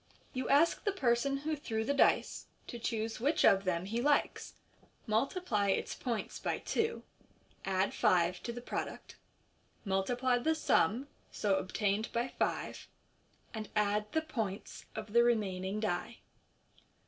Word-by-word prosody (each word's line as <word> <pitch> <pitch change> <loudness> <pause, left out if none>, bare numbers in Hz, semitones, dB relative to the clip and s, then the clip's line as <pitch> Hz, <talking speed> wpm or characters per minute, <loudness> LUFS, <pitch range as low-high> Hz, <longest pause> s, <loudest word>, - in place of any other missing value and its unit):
You 255 0 -3
ask 310 +4 +4
the 405 - +1
person 275 -5 +1
who 310 +3 -2
threw 220 -6 -3
the 280 - +1
dice 280 - +2 0.2
to 240 - -7
choose 225 -1 -2
which 280 +7 +2
of 195 0 +5
them 175 -1 0
he 225 +4 -2
likes, 290 +2 +1 0.5
multiply 225 - 0
its 195 - 0
points 235 -4 -3
by - - -1
two, 455 +1 -1 0.6
add 190 0 +1
five 175 0 +2
to 235 - -4
the 240 +1 -7
product, - - -5 0.7
multiply 245 +6 +1
the 315 +6 +1
sum 250 - +2 0.2
so 200 -2 +1
obtained 205 +3 -1
by 240 +2 -1
five, - - -2 0.7
and 215 -2 -5
add 210 0 +1
die 320 - 0
points 225 -11 -5
of 215 -1 -6
the 235 0 +6
remaining 200 -4 0
die. 215 +2 -2
225 Hz, 140 wpm, -33 LUFS, 200-260 Hz, 0.7 s, the